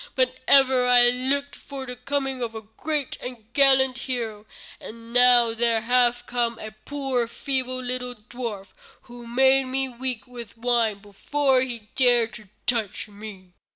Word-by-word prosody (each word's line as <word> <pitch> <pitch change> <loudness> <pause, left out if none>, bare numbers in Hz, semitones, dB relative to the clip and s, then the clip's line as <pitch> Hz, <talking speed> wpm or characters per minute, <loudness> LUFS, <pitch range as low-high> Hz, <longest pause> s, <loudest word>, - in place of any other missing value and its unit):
But 255 0 0
ever 260 -2 +5
I 245 -1 +6
looked 275 +3 -1
for 275 -2 -9
the 250 -1 -7
coming 270 0 -3
of 230 -2 -4
a 220 - -7
great 285 +6 -4
and 245 -3 -8
gallant 265 -2 +4
hero, 225 -5 -5 0.3
and 230 +1 -11
now 245 -2 +6
there 230 -1 +1
hath 245 +1 +2
come 235 -2 -1
a 215 -1 -8
poor 255 +2 -3
feeble, 255 +1 -3
little 250 0 -3
dwarf, 215 -3 -7 0.3
who 240 -1 -12
made 265 +2 +3
me 265 +1 +1
weak 250 -1 -3
with 235 -3 -11
wine 230 -3 +1
before 265 +6 0
he 235 -5 -5
dared 240 -3 +3
to 210 -2 -12 0.2
touch 220 -3 -2
me." 200 -3 -11
245 Hz, 155 wpm, -24 LUFS, 230-260 Hz, 0.3 s, I